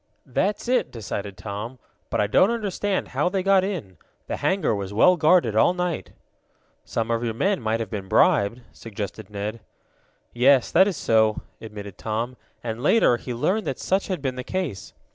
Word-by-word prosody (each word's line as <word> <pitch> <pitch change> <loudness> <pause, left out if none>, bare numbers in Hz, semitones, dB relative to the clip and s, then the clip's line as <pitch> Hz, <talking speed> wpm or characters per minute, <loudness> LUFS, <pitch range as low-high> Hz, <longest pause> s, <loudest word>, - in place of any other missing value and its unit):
"That's 205 +4 -1
it," 250 +1 +2
decided 100 -3 -6
Tom. 105 +6 -6 0.3
"But - - -1
I 105 - +3
don't 145 - +4
understand 205 -3 -1
how - - 0
they 190 0 -1
got 195 -1 +4
in. 170 - -4 0.3
The - - -4
hangar 190 - +1
was 100 -2 -4
well 180 - +5
guarded 160 - +3
all 145 +11 +4
night." 180 -2 -3 0.7
"Some 115 0 -2
of 115 0 0
your 115 -2 -2
men 195 - +1
might 110 0 0
have 110 -4 -4
been 100 -3 -5
bribed," 100 +5 +3
suggested 105 -1 -7
Ned. 105 +2 -4 0.7
"Yes, 130 +2 +4
that 190 +3 +6
is 190 -7 -2
so," 110 -1 +2 0.2
admitted 105 -3 -9
Tom, 115 +3 -3 0.3
and, 115 0 -4
later, 150 - +4
he 125 - -7
learned 185 - 0
that 135 - -2
such 190 +1 0
had 185 -7 -3
been 130 -2 -2
the 125 - -4
case. 160 - -4
120 Hz, 180 wpm, -24 LUFS, -, 0.7 s, that